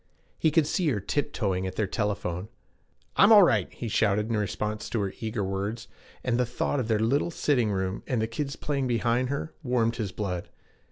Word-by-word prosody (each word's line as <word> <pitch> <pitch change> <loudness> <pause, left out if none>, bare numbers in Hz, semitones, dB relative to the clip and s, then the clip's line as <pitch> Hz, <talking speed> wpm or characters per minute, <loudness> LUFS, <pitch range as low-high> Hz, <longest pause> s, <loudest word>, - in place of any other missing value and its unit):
He 160 - +4
could 155 0 +3
see 175 +3 0
her 125 -8 +1
tiptoeing 100 -5 -1
at 95 - -6
their 110 - +1
telephone. 100 -3 -2 0.7
'I'm 200 - +7
all 210 -2 +10
right,' 110 - +2
he 120 - -6
shouted 105 0 +1
in - - +1
response 105 0 -2
to 115 - -1
her 95 -1 -2
eager 110 -2 -2
words; 100 +5 -3 0.4
and 125 -1 +1
the - - +4
thought 125 +3 -1
of 120 - -1
their 110 -2 +2
little 125 +9 +1
sitting 135 -8 +1
room, 95 0 -2
and 125 - 0
the 110 - +1
kids 140 +5 -4
playing 140 -3 -1
behind 120 +1 +1
her, 145 +3 -3
warmed 120 -4 +1
his 105 -5 -2
blood. 90 -3 -4
115 Hz, 200 wpm, -27 LUFS, 100-130 Hz, 0.7 s, all